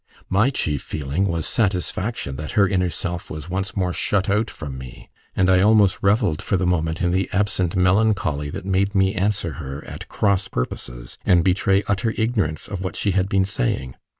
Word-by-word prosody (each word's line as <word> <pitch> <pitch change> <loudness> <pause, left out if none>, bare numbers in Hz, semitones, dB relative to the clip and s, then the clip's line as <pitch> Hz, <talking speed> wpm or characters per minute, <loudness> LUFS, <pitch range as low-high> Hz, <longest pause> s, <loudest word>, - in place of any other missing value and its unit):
My 105 +7 +4
chief 75 - -1
feeling 75 +6 -2
was 85 -3 -1
satisfaction 95 - -1
that 75 +1 -6
her 100 -2 +4
inner 90 -2 +1
self 85 0 -4
was 75 +3 -7
once 95 +2 -3
more 90 -2 0
shut 100 +1 0
out 105 +3 +1
from 70 -4 -7
me; 65 -1 -10 0.2
and 95 - +3
I 95 -1 +5
almost 105 -2 +4
revelled 100 -5 +2
for 95 - 0
the 90 - 0
moment 85 0 0
in 90 - +2
the 95 +1 0
absent 95 -3 0
melancholy 90 -5 +2
that 80 - -6
made 100 +1 +1
me 95 0 +3
answer 100 -4 0
her 70 +2 -7
at - - -8
cross 100 -2 +1
purposes, - - -5
and 85 -2 +4
betray 95 +2 +2
utter 110 +3 0
ignorance 105 -9 -1
of 100 -3 -5
what 90 -3 -4
she 100 - 0
had 95 +1 +1
been 95 -1 +2
saying. 65 -8 -2
95 Hz, 190 wpm, -22 LUFS, 80-100 Hz, 0.2 s, I